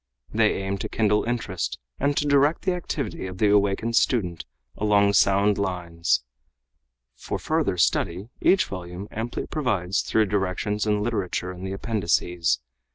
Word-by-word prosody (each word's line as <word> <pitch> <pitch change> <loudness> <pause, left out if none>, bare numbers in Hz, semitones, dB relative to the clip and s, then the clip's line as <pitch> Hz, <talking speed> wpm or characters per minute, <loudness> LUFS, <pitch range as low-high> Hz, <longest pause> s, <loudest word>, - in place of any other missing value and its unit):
They - - +3
aim 95 0 -2
to - - -4
kindle 105 -1 +2
interest 120 0 -2 0.2
and 140 +1 +1
to 150 - +1
direct 145 +2 +3
the 185 - +1
activity 140 - -4
of 90 0 -7
the 105 +2 +3
awakened 105 +3 +2
student 90 - +1 0.3
along 100 -1 +3
sound 100 +1 +4
lines. 85 -7 0 0.9
For - - -5
further 155 - 0
study 90 - +1
each 190 0 +4
volume 90 +1 -7
amply 115 +2 -4
provides 105 - 0
through 110 -1 +2
directions 105 +2 -1
and 105 -1 +1
literature 100 -5 -2
in 90 0 -9
the 95 - -3
appendices. 90 - 0
100 Hz, 145 wpm, -25 LUFS, 90-115 Hz, 0.9 s, sound